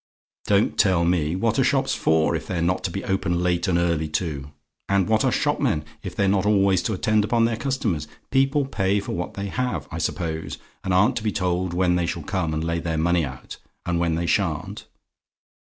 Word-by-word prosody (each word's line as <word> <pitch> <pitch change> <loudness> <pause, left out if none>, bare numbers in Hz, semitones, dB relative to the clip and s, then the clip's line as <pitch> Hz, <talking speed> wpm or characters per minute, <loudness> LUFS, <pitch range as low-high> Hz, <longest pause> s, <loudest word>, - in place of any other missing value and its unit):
"Don't 100 0 +2
tell 90 -4 +4
me! 85 -2 +1
What 115 +3 +1
are - - +5
shops - - +1
for, 80 +1 +2
if 80 - -5
they're 90 - -2
not 90 +2 0
to - - 0
be 95 +3 -5
open 90 -2 0
late 90 -1 +1
and 90 -2 +2
early 85 -2 +1
too? 75 -3 -3 0.4
And 100 -1 +2
what 110 0 +2
are - - +2
shopmen, 75 0 0 0.2
if - - -7
they're 100 - +2
not 95 -1 +2
always 100 -3 +3
to 110 - -1
attend 105 +2 +2
upon 115 +2 +2
their 115 0 0
customers? 110 - -2 0.2
People 135 +1 +2
pay 100 -6 0
for 100 - -5
what 90 +1 -4
they 100 - -4
have, 125 +2 -2
I - - -4
suppose, 80 -2 -3 0.3
and 95 - -2
aren't 95 +3 +3
to 110 - -3
be 110 - 0
told 90 -2 -1
when 90 -1 +2
they 85 -1 0
shall 85 -1 -3
come 85 -1 -1
and 80 0 -2
lay 85 0 -1
their 80 -1 -2
money 85 +1 +2
out, 65 -3 -7 0.3
and 85 -1 0
when 85 -2 +1
they 85 +1 -1
sha'n't? 85 -4 -1
90 Hz, 215 wpm, -24 LUFS, 85-100 Hz, 0.4 s, are